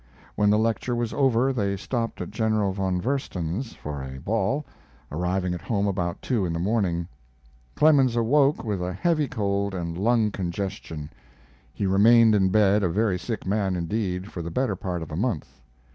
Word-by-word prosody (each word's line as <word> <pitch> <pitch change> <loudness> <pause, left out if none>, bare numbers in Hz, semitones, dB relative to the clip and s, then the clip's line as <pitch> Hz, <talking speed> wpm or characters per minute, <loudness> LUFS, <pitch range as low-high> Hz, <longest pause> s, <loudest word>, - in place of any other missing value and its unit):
When 105 0 +2
the 105 - +4
lecture 115 +2 0
was 120 -1 -2
over 135 -1 +2
they 100 -5 -1
stopped 115 +2 -3
at 90 - -5
General 110 -2 +1
von 95 -2 -1
Versen's 115 - -3
for 75 -2 -6
a 65 0 -7
ball, 115 - -1 0.5
arriving 90 +3 -1
at 90 - -5
home 100 -4 -1
about 90 -3 -2
two 120 -6 0
in 85 -2 -1
the 85 - -2
morning. 90 -4 0 0.7
Clemens 140 -6 +4
awoke 135 +5 +3
with 105 -6 -2
a 90 +1 -2
heavy 155 - +1
cold 100 -5 -1
and 85 -2 -3
lung 110 +3 +2
congestion. 85 -5 -5 0.6
He 100 - -3
remained 110 +4 +6
in 95 -2 +3
bed, 105 +1 +4
a 90 - +1
very 100 0 +1
sick 115 +3 -4
man 95 -1 0
indeed, 90 +2 -2
for 85 - -5
the 85 - -5
better 130 +10 0
part 90 -5 -4
of 80 - -10
a - - -4
month. 80 - -3
100 Hz, 175 wpm, -25 LUFS, 90-115 Hz, 0.7 s, remained